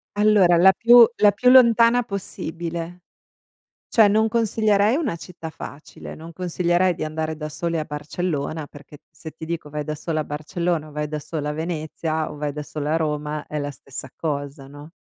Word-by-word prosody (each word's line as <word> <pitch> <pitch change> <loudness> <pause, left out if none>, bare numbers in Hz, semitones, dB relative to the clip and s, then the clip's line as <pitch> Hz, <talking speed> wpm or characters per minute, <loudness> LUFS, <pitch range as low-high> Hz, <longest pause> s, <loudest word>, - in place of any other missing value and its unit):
Allora 205 -5 +4
la 190 +3 +7
più 240 0 +8
la 205 -1 +6
più 250 +5 +2
lontana 235 -1 +6
possibile. 175 -4 -6 0.9
Cioè, 220 -3 +5
non 220 +2 +3
consiglierei 215 -1 +2
una 290 - -1
città 170 -1 -9
facile, 150 -1 -10
non 165 +1 -11
consiglierei 180 0 +1
di - - -4
andare 155 0 -3
da 150 0 -5
soli 165 +2 -3
a 155 - -1
Barcellona, 150 0 -4
perché 145 +1 -14
se 160 - -10
ti 160 - -9
dico 165 -2 -5
vai 150 0 -4
da 155 - -3
solo 155 +1 -3
a - - 0
Barcellona 155 +2 -2
o - - -13
vai 150 0 -3
da 150 0 -4
solo 150 0 -5
a - - -1
Venezia 160 0 -3
o - - -9
vai 145 0 -2
da 150 +1 -6
solo 145 0 -5
a 155 - +2
Roma 150 -1 -3
è 150 - -5
la 145 0 -3
stessa 135 -1 -9
cosa, 145 -2 -4
no. 145 +3 -12
160 Hz, 185 wpm, -22 LUFS, 150-185 Hz, 0.9 s, più